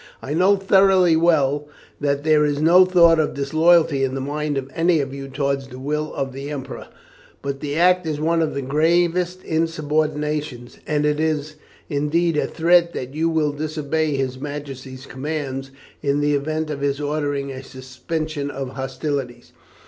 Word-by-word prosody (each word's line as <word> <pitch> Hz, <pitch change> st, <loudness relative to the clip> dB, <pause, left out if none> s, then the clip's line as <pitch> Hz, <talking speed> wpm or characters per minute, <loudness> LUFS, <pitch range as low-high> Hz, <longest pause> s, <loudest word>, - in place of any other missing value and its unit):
I 140 Hz, -, -5 dB
know 185 Hz, +5 st, +4 dB
thoroughly 190 Hz, -3 st, +4 dB
well 150 Hz, -3 st, +2 dB, 0.3 s
that 140 Hz, 0 st, 0 dB
there 155 Hz, -1 st, +4 dB
is 145 Hz, -1 st, 0 dB
no 175 Hz, +4 st, +6 dB
thought 170 Hz, -3 st, +5 dB
of 155 Hz, -, 0 dB
disloyalty 155 Hz, 0 st, +3 dB
in 135 Hz, 0 st, -1 dB
the -, -, -2 dB
mind 145 Hz, +2 st, -2 dB
of 135 Hz, -1 st, -3 dB
any 165 Hz, 0 st, +2 dB
of 135 Hz, -2 st, -3 dB
you 135 Hz, 0 st, -6 dB
towards 140 Hz, 0 st, -2 dB
the 125 Hz, -, -11 dB
will 150 Hz, +3 st, -3 dB
of 135 Hz, -1 st, -3 dB
the 135 Hz, +2 st, -6 dB
Emperor, 145 Hz, -3 st, -6 dB, 0.6 s
but 140 Hz, -1 st, -3 dB
the 145 Hz, 0 st, -4 dB
act 180 Hz, +1 st, +3 dB
is 150 Hz, -2 st, -2 dB
one 165 Hz, +2 st, +1 dB
of 155 Hz, -3 st, -1 dB
the 140 Hz, -, -2 dB
gravest 175 Hz, +5 st, +1 dB
insubordination, 150 Hz, -4 st, -1 dB, 0.2 s
and 150 Hz, -1 st, +1 dB
it 150 Hz, 0 st, +1 dB
is 155 Hz, -1 st, -1 dB, 0.3 s
indeed 155 Hz, +4 st, 0 dB
a 150 Hz, -, +1 dB
threat 170 Hz, +1 st, +3 dB
that 130 Hz, +1 st, -5 dB
you 160 Hz, +2 st, 0 dB
will 155 Hz, -2 st, +1 dB
disobey 155 Hz, 0 st, -2 dB
his 130 Hz, -1 st, -2 dB
Majesty's 135 Hz, -2 st, -7 dB
commands 135 Hz, -1 st, -4 dB, 0.3 s
in 140 Hz, 0 st, +1 dB
the 145 Hz, 0 st, +1 dB
event 155 Hz, +2 st, -2 dB
of 140 Hz, -2 st, -5 dB
his 140 Hz, 0 st, 0 dB
ordering 145 Hz, -2 st, -2 dB
a 130 Hz, 0 st, -7 dB
suspension 140 Hz, +4 st, -5 dB
of 135 Hz, -2 st, -5 dB
hostilities. 135 Hz, -1 st, -4 dB
150 Hz, 170 wpm, -21 LUFS, 140-160 Hz, 0.6 s, no